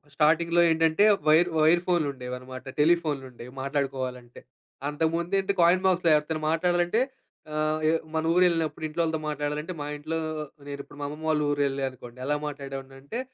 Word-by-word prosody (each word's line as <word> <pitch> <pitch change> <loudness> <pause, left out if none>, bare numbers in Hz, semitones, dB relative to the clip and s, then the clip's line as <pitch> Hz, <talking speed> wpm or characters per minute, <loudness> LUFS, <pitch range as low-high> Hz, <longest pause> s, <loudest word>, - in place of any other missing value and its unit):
స్టార్టింగ్‌లో 165 +3 +3
ఏంటంటే, 160 +4 +3 0.2
wire 160 +3 +5
wire 165 +3 +5
ఫోన్‌లు 165 -5 +2
ఉండేవన్నమాట. 125 0 -8 0.2
టెలిఫోన్‌లుండేవి 140 -7 0
మాట్లాడుకోవాలంటే. 130 -3 -3 0.5
అంతకు 160 +2 0
ముందేంటి? 195 +3 0
కాయిన్ 175 +2 +4
బాక్స్‌లో 180 -3 +3
ఎవరితో 155 +1 -1
మాట్లాడాలంటే 175 +6 +2 0.5
ఆహ్, 155 0 0
ఎ - - +4 0.2
మన 160 0 0
ఊరెళ్ళినప్పుడు 165 -4 +2
ఇంట్లో 165 +2 -2
వాళ్ళతో 160 -1 -1
మాట్లాడాలంటే, 150 +3 -3
మా - - -3
ఇంట్లో 155 +2 -3 0.5
నేను 140 0 -6
ఇప్పుడు 145 - -16
మా - - -2
అమ్మమ్మ 150 +2 -7
వాళ్ళ 155 -1 +2
ఊరెళ్ళా 140 -1 0
అనుకోండి. 125 -1 -13
ఎలా 145 +2 +1
మాట్లాడేవాడినంటే 135 - -7
155 Hz, 145 wpm, -27 LUFS, 140-170 Hz, 0.5 s, wire